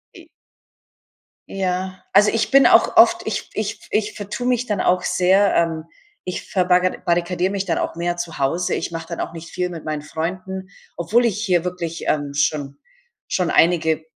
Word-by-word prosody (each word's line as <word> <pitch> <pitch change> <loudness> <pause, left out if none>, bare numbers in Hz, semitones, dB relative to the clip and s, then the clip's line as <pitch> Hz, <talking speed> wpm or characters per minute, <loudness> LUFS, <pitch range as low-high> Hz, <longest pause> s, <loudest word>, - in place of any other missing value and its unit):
I - - -14 1.2
Ja. 185 0 -3
Also, 210 +1 +6
ich 225 -2 -1
bin 275 0 +7
auch - - +4
oft - - +6
ich - - -3
ich - - -4
ich 210 0 -1
vertue 210 +4 -6
mich 250 0 0
dann 210 - -1
auch 180 0 +2
sehr, 190 +2 +3
ähm, 165 -1 0 0.4
ich 180 - -5
verbarra 180 -1 +2
barrikadiere 175 +1 0
mich 200 -1 -2
dann 170 - -1
auch - - -3
mehr 175 +1 -2
zu 175 -1 -5
Hause 145 +6 0
ich - - -4
mache 165 -1 -6
dann 170 - -6
auch - - -4
nicht 165 0 -9
viel 180 0 -2
mit 170 -3 -8
meinen 150 -1 -4
Freunden, 185 +5 -5 0.3
obwohl 220 +8 +2
ich 210 -2 -1
hier 180 -5 +2
wirklich, 175 -2 -5
ähm, 145 -2 -1
schon 145 -1 -1 0.5
schon 180 -2 0
einige 160 -2 +2
180 Hz, 180 wpm, -21 LUFS, 165-190 Hz, 1.2 s, bin